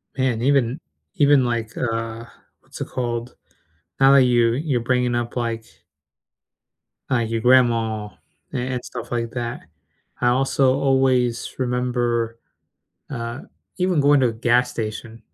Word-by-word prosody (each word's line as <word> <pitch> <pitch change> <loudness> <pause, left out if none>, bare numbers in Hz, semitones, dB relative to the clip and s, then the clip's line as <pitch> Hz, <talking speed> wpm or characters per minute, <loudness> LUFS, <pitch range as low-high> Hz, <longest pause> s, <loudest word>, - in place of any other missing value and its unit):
Man, 130 -4 0
even 135 0 +2 0.4
even, 145 -3 +5
like, 115 -1 -2
uh 115 -1 -3 0.3
what's - - -13
it - - -3
called? 120 -1 -4 0.6
Now 135 0 +6
that 135 -2 +7
you 120 -2 +3
you're 140 -1 -1
bringing 125 0 +1
up, 120 0 -3
like 115 -2 -2 1.4
Uh, 130 - +2
your 115 0 -1
grandma 115 -3 +3 0.5
a - - -2
and 125 0 -3
stuff - - -8
like 115 -1 -2
that, 120 +2 -4 0.6
I 120 - +3
also 130 +1 +2
always 130 -3 +1
remember, 120 -2 -1 0.7
uh 120 0 -5 0.4
even 180 -3 +2
going 145 +1 +5
to 125 - +3
a - - -3
gas 120 +2 +2
station, 110 0 -6
120 Hz, 135 wpm, -22 LUFS, 115-130 Hz, 1.4 s, that